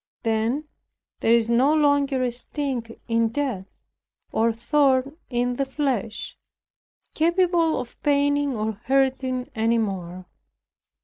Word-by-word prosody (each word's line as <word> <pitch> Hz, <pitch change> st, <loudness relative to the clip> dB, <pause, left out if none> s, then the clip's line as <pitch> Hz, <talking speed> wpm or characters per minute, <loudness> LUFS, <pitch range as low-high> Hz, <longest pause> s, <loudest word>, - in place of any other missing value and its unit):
Then 230 Hz, +6 st, 0 dB, 0.5 s
there 225 Hz, -, +2 dB
is 230 Hz, -1 st, +2 dB
no 255 Hz, +6 st, +3 dB
longer 285 Hz, -3 st, +2 dB
a 250 Hz, -, 0 dB
sting 245 Hz, -2 st, -4 dB
in 230 Hz, -1 st, +2 dB
death, 235 Hz, -7 st, -3 dB, 0.6 s
or 230 Hz, +1 st, +2 dB
thorn 270 Hz, +4 st, +1 dB
in 245 Hz, 0 st, -1 dB
the 275 Hz, -, 0 dB
flesh, 265 Hz, -6 st, -3 dB, 0.7 s
capable 340 Hz, 0 st, +2 dB
of 240 Hz, -, -9 dB
paining 285 Hz, -1 st, +2 dB
or 215 Hz, +1 st, -1 dB
hurting 260 Hz, 0 st, 0 dB
any 225 Hz, +1 st, +1 dB
more. 185 Hz, -4 st, -3 dB
255 Hz, 115 wpm, -24 LUFS, 230-285 Hz, 0.7 s, no